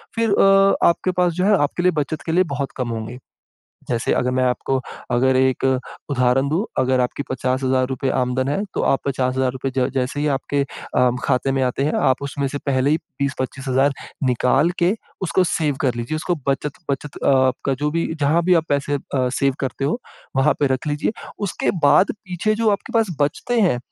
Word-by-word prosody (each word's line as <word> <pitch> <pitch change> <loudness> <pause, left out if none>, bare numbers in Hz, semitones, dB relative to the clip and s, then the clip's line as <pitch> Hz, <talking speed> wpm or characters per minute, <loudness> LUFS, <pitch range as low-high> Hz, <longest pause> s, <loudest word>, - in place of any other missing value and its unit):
फिर 230 -1 +1
अ, 195 0 +5
आपके 170 +2 +1
पास 180 -1 +1
जो 180 +3 0
है 205 0 +5
आपके 155 +4 -2
लिए 180 - +4
बचत 150 +2 -4
के - - 0
लिए 180 +3 +4
बहुत 140 -1 -3
कम 125 -2 -2
होंगे। 115 +1 -5 0.7
जैसे 120 -1 0
अगर 125 - +1
मैं 130 0 +1
आपको 130 +1 0 0.3
अगर 130 +2 +3
एक 130 0 +2 0.5
उदाहरण 130 0 +2
दूँ, 165 +8 0
अगर 130 0 +2
आपके 125 +3 -1
₹50,000 130 0 0
आमदन 130 +1 0
है, 145 +8 0
तो - - -1
आप 135 - +3
₹50,000 130 0 -1
ज 125 0 +2
जैसे 130 +2 -1
ही 150 - 0
आपके 140 +1 -1
अ, 125 -2 0
खाते 130 +2 +1
में 135 0 0
आते 130 +2 -1
हैं 150 - 0 0.2
आप 130 - 0
उसमें 140 0 -2
से 145 - -4
पहले 135 0 +2
ही 155 - +4 0.2
20-25,000 135 0 0 0.3
निकाल 130 +5 +2
के 180 +4 +4 0.3
उसको 185 +1 +2
सेव 150 -4 0
कर 130 -4 +1
लीजिए 120 +6 -3
उसको 165 +3 -1
बचत 140 +1 0 0.2
बचत 140 +1 -4
आपका 130 0 +2
जो 145 +3 -1
भी, 165 +1 0
जहाँ 155 +2 +2
भी 180 +1 +4
आप 165 -2 +2
पैसे 145 0 0
अ, 130 -2 -1
सेव 135 -1 +2
करते 135 0 -3
हो, 155 - 0 0.4
वहाँ 135 +3 +4
पे 145 - +4
रख 130 - -6
लीजिए, 145 +7 -1 0.4
उसके - - -1
बाद 185 +6 +5
पीछे 185 +2 -2
जो 220 0 +2
आपके 200 - -3
पास 220 -8 +1
बचते 185 +11 0
हैं 180 - +3
140 Hz, 195 wpm, -21 LUFS, 130-160 Hz, 0.7 s, अ